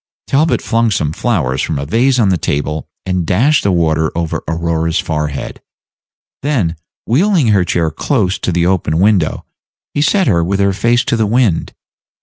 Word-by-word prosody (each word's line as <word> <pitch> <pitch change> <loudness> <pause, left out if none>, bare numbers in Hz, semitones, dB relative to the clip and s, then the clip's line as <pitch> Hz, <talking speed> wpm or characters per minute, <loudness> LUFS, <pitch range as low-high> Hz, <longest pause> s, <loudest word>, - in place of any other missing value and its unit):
Talbot 155 +4 +1
flung 115 -1 +1
some 80 -7 -1
flowers 75 - -1
from - - -2
a 70 - -3
vase 125 - +2
on 110 -5 +3
the 95 - +2
table, 75 +2 -2 0.2
and 90 -2 -1
dashed 125 - +2
the 100 - +1
water 80 -2 +1
over 85 -2 -2
Aurora's 80 +1 -1
forehead; 75 -3 -3 0.8
then, 120 - 0 0.3
wheeling 160 - +2
her 100 -3 +3
chair 85 -2 0
close 100 - -1
to - - -2
the 85 0 +1
open 85 -4 0
window, 95 -3 +1 0.5
he 145 - 0
set 190 +6 +2
her 85 - +2
with 95 +3 -1
her 100 0 +2
face 120 +5 +1
to - - 0
the 110 -2 +1
wind. 110 -6 0
95 Hz, 170 wpm, -15 LUFS, 80-120 Hz, 0.8 s, on